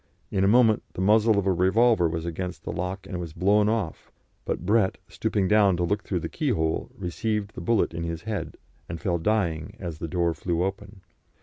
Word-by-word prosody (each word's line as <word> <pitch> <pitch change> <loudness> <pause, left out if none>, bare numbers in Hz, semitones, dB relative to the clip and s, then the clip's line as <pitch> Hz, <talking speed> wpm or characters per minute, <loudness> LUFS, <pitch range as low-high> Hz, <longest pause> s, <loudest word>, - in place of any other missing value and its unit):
In 95 - +1
a - - +4
moment 110 0 +5
the - - -4
muzzle 110 +2 +4
of 100 - +1
a 95 - +3
revolver 95 +1 +3
was 80 0 -3
against 90 +2 -5
the - - -4
lock, 90 +2 -4
and 95 - -9
it - - -3
was 85 -3 -6
blown 105 +4 +3
off; 110 -7 -3 0.3
but 85 - -3
Brett, 105 -1 +2
stooping 100 -3 -1
down 100 -3 +4
to 90 - 0
look 100 +4 0
through 90 -5 -3
the - - -3
keyhole, 100 - -1
received 105 +4 -2
the - - -7
bullet 115 -7 +1
in 85 - -4
his 85 -1 -4
head, 110 -2 -4 0.3
and 85 0 -5
fell 85 -4 -1
dying 85 -5 -1
as 85 -4 -6
the 85 - -4
door 85 0 0
flew 85 +2 -1
open. 95 +1 -5
95 Hz, 210 wpm, -26 LUFS, 85-105 Hz, 0.3 s, moment